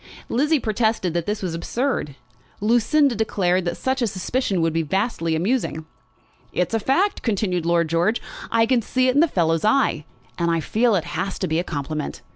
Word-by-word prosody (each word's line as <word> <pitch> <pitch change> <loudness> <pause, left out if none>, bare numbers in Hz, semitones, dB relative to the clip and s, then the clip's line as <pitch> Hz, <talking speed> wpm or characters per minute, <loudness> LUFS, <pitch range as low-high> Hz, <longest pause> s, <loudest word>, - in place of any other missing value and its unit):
Lizzie 295 +5 +2
protested 220 -5 0
that 170 -1 -2
this 210 -1 -2
was 180 -3 -2
absurd. 170 - -2 0.4
Lucinda 240 +6 +3
declared 185 -5 0
that 175 0 -2
such 260 0 -1
a 235 - +2
suspicion 195 +1 -1
would 165 -1 +1
be 165 - +1
vastly 165 -1 -1
amusing. 175 -3 -1 0.7
"It's 180 - -1
a 225 - +2
fact," 350 - +1
continued 185 -6 -1
Lord 170 -1 +2
George. 170 +8 +1 0.3
"I 225 0 +3
can 245 0 +2
see 255 +3 +1
it - - +2
in 285 - +4
the 335 - +5
fellow's 165 - +1
eye, 215 - +2 0.3
and 170 0 +1
I 165 0 +1
feel 225 +7 +2
it 175 -3 0 0.3
to 185 - -2
be 160 0 0
a - - 0
compliment. 150 -2 -4
200 Hz, 185 wpm, -22 LUFS, 170-240 Hz, 0.7 s, the